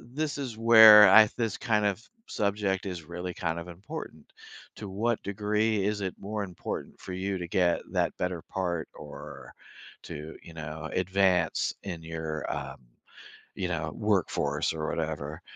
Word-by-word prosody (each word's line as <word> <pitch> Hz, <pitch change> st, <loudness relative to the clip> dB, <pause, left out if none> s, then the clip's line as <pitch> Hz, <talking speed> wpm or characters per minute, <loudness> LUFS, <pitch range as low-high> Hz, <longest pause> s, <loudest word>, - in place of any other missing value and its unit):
this 145 Hz, +5 st, -4 dB
is 125 Hz, -6 st, -5 dB
where 110 Hz, -2 st, +9 dB
I 110 Hz, +1 st, +8 dB
this 115 Hz, -4 st, -1 dB
kind 105 Hz, -4 st, +1 dB
of 100 Hz, +3 st, -2 dB, 0.2 s
subject 100 Hz, -2 st, -1 dB
is 90 Hz, -4 st, -5 dB
really 90 Hz, +1 st, -6 dB
kind 80 Hz, -1 st, -2 dB
of 85 Hz, +1 st, -7 dB
important. 95 Hz, -, -9 dB, 0.4 s
To 105 Hz, -, -7 dB
what 110 Hz, +4 st, -1 dB
degree 105 Hz, +1 st, 0 dB
is 105 Hz, 0 st, -1 dB
it 95 Hz, -2 st, -3 dB
more 105 Hz, +1 st, -4 dB
important 90 Hz, -3 st, -7 dB
for 90 Hz, -, -8 dB
you 95 Hz, +1 st, -2 dB
to 85 Hz, -1 st, -6 dB
get 90 Hz, -2 st, +2 dB
that -, -, 0 dB
better 90 Hz, -3 st, -2 dB
part 85 Hz, -4 st, -3 dB
or -, -, -10 dB, 0.5 s
to, 75 Hz, +2 st, -8 dB
you 85 Hz, -, -13 dB
know, 80 Hz, 0 st, -6 dB
advance 90 Hz, -2 st, +1 dB
in 85 Hz, -5 st, -6 dB
your, 80 Hz, -2 st, -5 dB
um, -, -, -5 dB, 0.8 s
you 95 Hz, -2 st, -2 dB
know, 80 Hz, -3 st, -3 dB
workforce 105 Hz, -6 st, 0 dB
or 80 Hz, -1 st, -3 dB
whatever? 80 Hz, -2 st, -4 dB
95 Hz, 155 wpm, -28 LUFS, 85-105 Hz, 0.8 s, where